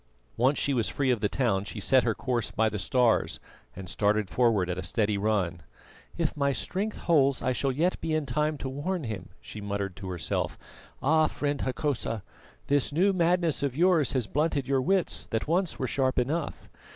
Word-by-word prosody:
Once 130 Hz, +5 st, +2 dB
she 140 Hz, -, +1 dB
was 120 Hz, -4 st, +1 dB
free 135 Hz, -2 st, +1 dB
of 120 Hz, -, +1 dB
the 105 Hz, -, 0 dB
town, 110 Hz, -7 st, +1 dB
she 105 Hz, +1 st, -7 dB
set 130 Hz, +6 st, +4 dB
her 115 Hz, -3 st, 0 dB
course 120 Hz, -4 st, -1 dB
by 110 Hz, 0 st, +1 dB
the 105 Hz, -, -4 dB
stars 120 Hz, +4 st, +2 dB, 0.4 s
and 95 Hz, 0 st, -8 dB
started 105 Hz, +1 st, 0 dB
forward 115 Hz, -7 st, +2 dB
at 90 Hz, 0 st, -3 dB
a -, -, -2 dB
steady 105 Hz, 0 st, 0 dB
run. 100 Hz, -5 st, 0 dB, 0.6 s
"If 165 Hz, -2 st, 0 dB
my 140 Hz, -2 st, +1 dB
strength 205 Hz, +9 st, -3 dB
holds 140 Hz, -5 st, +3 dB
I 130 Hz, -, +1 dB
shall 135 Hz, +2 st, 0 dB
yet 165 Hz, +8 st, 0 dB
be 160 Hz, -1 st, -1 dB
in 155 Hz, -2 st, 0 dB
time 150 Hz, +4 st, 0 dB
to 135 Hz, -, -5 dB
warn 155 Hz, +6 st, -3 dB
him," 110 Hz, -6 st, -5 dB
she 105 Hz, -, -8 dB
muttered 100 Hz, -2 st, -3 dB
to 95 Hz, -2 st, -6 dB
herself. 90 Hz, -2 st, -2 dB, 0.5 s
"Ah! 155 Hz, +2 st, +4 dB
friend 145 Hz, -1 st, -2 dB
Hokosa, 130 Hz, -5 st, -2 dB, 0.4 s
this 145 Hz, 0 st, +2 dB
new 185 Hz, +7 st, +3 dB
madness 170 Hz, -3 st, +2 dB
of 140 Hz, -2 st, -2 dB
yours 170 Hz, -5 st, +3 dB
has 130 Hz, -4 st, 0 dB
blunted 145 Hz, 0 st, 0 dB
your 135 Hz, -1 st, +2 dB
wits 190 Hz, +6 st, 0 dB
that 110 Hz, +4 st, -2 dB
once 175 Hz, +2 st, 0 dB
were 130 Hz, -, -2 dB
sharp 130 Hz, 0 st, 0 dB
enough. 145 Hz, +6 st, -1 dB
130 Hz, 195 wpm, -28 LUFS, 110-150 Hz, 0.6 s, set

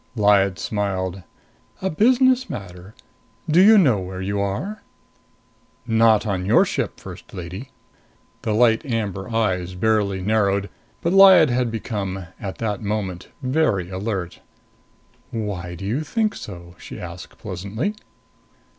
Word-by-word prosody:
Lyad 100 Hz, -3 st, +3 dB
smiled. 95 Hz, 0 st, -2 dB, 0.6 s
"A 190 Hz, -, -2 dB
business 255 Hz, -, +3 dB
matter. 95 Hz, +1 st, -8 dB, 0.5 s
Do 165 Hz, +3 st, +5 dB
you 215 Hz, +3 st, +8 dB
know 130 Hz, -, +4 dB
where 95 Hz, 0 st, -6 dB
you 100 Hz, +2 st, -2 dB
are?" 100 Hz, -, -3 dB, 1.0 s
"Not 115 Hz, -2 st, +4 dB
on 95 Hz, -4 st, -1 dB
your 100 Hz, -, +4 dB
ship, -, -, -3 dB
First -, -, -11 dB
Lady." 95 Hz, +8 st, -7 dB, 0.7 s
The 110 Hz, -, -1 dB
light 115 Hz, 0 st, +3 dB
amber 105 Hz, -7 st, -3 dB
eyes 95 Hz, -6 st, -1 dB
barely 100 Hz, -1 st, +1 dB
narrowed. 100 Hz, 0 st, +1 dB, 0.3 s
But 170 Hz, -, +1 dB
Lyad 190 Hz, -7 st, +8 dB
had 125 Hz, 0 st, +1 dB
become, 100 Hz, -5 st, -4 dB
at 95 Hz, -2 st, -6 dB
that 105 Hz, -3 st, -2 dB
moment, 100 Hz, -4 st, -3 dB, 0.2 s
very 130 Hz, -, +1 dB
alert. 95 Hz, -2 st, -4 dB, 0.9 s
"Why 95 Hz, -6 st, -4 dB
do 95 Hz, -, -7 dB
you 120 Hz, +10 st, -1 dB
think 215 Hz, +6 st, 0 dB
so?" 85 Hz, -3 st, -9 dB
she -, -, -9 dB
asked 85 Hz, -2 st, -9 dB
pleasantly. 100 Hz, -, -4 dB
105 Hz, 130 wpm, -22 LUFS, 95-120 Hz, 1.0 s, you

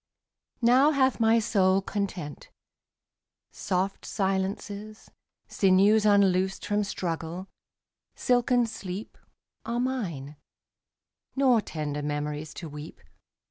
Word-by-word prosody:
Now 255 Hz, +5 st, +6 dB
hath 265 Hz, -4 st, +2 dB
my 225 Hz, 0 st, +4 dB
soul 195 Hz, -4 st, +3 dB
content. 195 Hz, -7 st, -5 dB, 1.0 s
Soft 190 Hz, +1 st, -2 dB
silences, 200 Hz, +2 st, -3 dB, 0.4 s
Sinews 200 Hz, +3 st, +4 dB
unloosed 190 Hz, -2 st, +3 dB
from 210 Hz, 0 st, +1 dB
struggle, 175 Hz, -1 st, -4 dB, 0.7 s
silken 245 Hz, 0 st, +2 dB
sleep, 205 Hz, -2 st, -7 dB, 0.5 s
27 235 Hz, -, -3 dB
Are -, -, 0 dB
mine; 180 Hz, -, -3 dB, 1.0 s
nor 260 Hz, -4 st, +4 dB
tender 150 Hz, -5 st, -4 dB
memories 150 Hz, +1 st, -3 dB
to 170 Hz, -, -7 dB
weep. 150 Hz, +1 st, -9 dB
195 Hz, 95 wpm, -27 LUFS, 175-225 Hz, 1.0 s, Now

